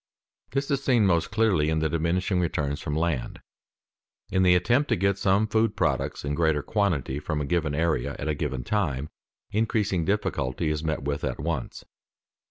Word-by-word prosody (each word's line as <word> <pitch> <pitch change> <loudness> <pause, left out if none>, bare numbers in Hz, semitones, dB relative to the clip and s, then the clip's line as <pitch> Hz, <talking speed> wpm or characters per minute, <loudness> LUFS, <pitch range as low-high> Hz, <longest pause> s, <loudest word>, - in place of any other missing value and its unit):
_ - - -24
This 140 +2 0
is 140 -1 0
seen 120 -6 +3
most 85 -4 +2
clearly 105 -8 +2
in 80 - +1
the 80 0 +1
diminishing 85 +4 0
returns 75 -3 -1
from 75 -2 -3
land. 80 -6 -1 0.9
In 95 - +2
the 90 -1 +5
attempt 120 +11 +2
to - - +3
get 100 +1 +1
some 100 +2 +3
food 110 0 +1
products - - -1
in 70 - -1
greater 80 -2 +1
quantity 80 - 0
from 75 0 -3
a 75 - -1
given 75 -1 0
area 80 -5 0
at - - -4
a 75 - +1
given 65 -4 -3
time, 75 - -1 0.4
increasing 105 -4 +1
difficulty 80 -6 -1
is 75 0 -2
met 80 -3 -2
with 70 +1 -2
at - - -2
once. 80 -5 -4
85 Hz, 180 wpm, -26 LUFS, 75-100 Hz, 0.9 s, the